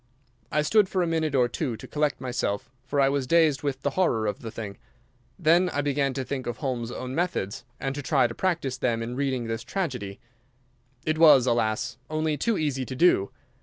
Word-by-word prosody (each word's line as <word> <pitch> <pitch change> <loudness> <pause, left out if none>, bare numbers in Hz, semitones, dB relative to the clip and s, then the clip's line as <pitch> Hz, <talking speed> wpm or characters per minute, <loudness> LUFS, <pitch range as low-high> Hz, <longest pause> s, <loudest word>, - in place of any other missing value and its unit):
I 150 - +2
stood 210 +3 +4
for 185 -2 +1
a - - +1
minute 160 -3 0
or 125 -2 +4
two 120 0 -3
to - - -10
collect 150 -1 0
myself, 120 -5 -2
for 140 +2 -2
I 135 - +5
was 135 -1 0
dazed 160 -3 +4
with 135 -2 -3
the 145 - +1
horror 130 -11 +1
of 105 - -2
the 115 - -6
thing. 105 -3 -7 0.6
Then 175 +3 +4
I 145 - -1
began 140 -1 0
to 135 - -2
think 130 0 -4
of 120 -1 -3
Holmes's 125 -4 -3
own 130 0 -5
methods 155 - -2
and 135 - -2
to 145 - -4
try 135 -2 +3
to 115 - -2
practise 155 -6 -1
them 115 -3 0
in 120 +2 -5
reading 130 -3 -1
this 115 0 -3
tragedy. 125 - -4 0.9
It 155 0 0
was, 150 -6 +8
alas, 120 +1 0
only 155 0 0
too 210 +9 0
easy 140 -4 -1
to 130 - -6
do. 130 - +4
135 Hz, 205 wpm, -26 LUFS, 120-155 Hz, 0.9 s, was